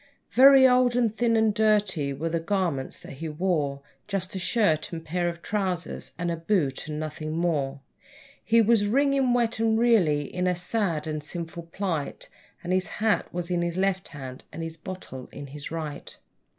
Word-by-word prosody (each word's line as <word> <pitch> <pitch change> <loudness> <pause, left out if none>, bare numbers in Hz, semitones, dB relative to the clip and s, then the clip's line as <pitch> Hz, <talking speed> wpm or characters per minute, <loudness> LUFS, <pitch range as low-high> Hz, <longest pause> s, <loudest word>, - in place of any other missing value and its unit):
Very 270 0 +8
old 250 -1 +4
and 235 -4 +2
thin 230 0 +2
and 220 -1 +3
dirty 205 -9 +2
were 150 +5 -3
the 165 0 0
garments 165 -7 -1
that - - -10
he 165 - -3
wore, 150 -4 -1 0.2
Just 195 -2 -3
a 190 - -3
shirt 180 -5 +1
and 165 -1 -6
pair 175 +2 0
of 170 0 -8
trousers, 190 -4 -2
and 175 -1 -1
a - - -1
boot, 165 -6 -1
and 150 -1 -4
nothing 155 0 -4
more; 145 -5 -1 0.6
He 230 0 +4
was 215 -2 +3
wringing 275 +2 +2
wet, 235 -2 +1
and 225 -1 +2
really 195 -11 +3
in 180 +5 -2
a 180 - +2
sad 175 -4 0
and 155 -1 -3
sinful 165 +1 -5
plight, 170 -7 -3 0.3
And 175 +1 -1
his 185 0 +1
hat 220 -1 +1
was 175 0 -4
in 175 -1 +1
his 170 0 -2
left 190 0 0
hand, 135 -4 -8
and 165 - -6
a 165 0 -6
bottle 155 -9 -7
in 145 - -8
his 140 +1 -7
right. 155 -3 -6
175 Hz, 185 wpm, -26 LUFS, 155-215 Hz, 0.6 s, Very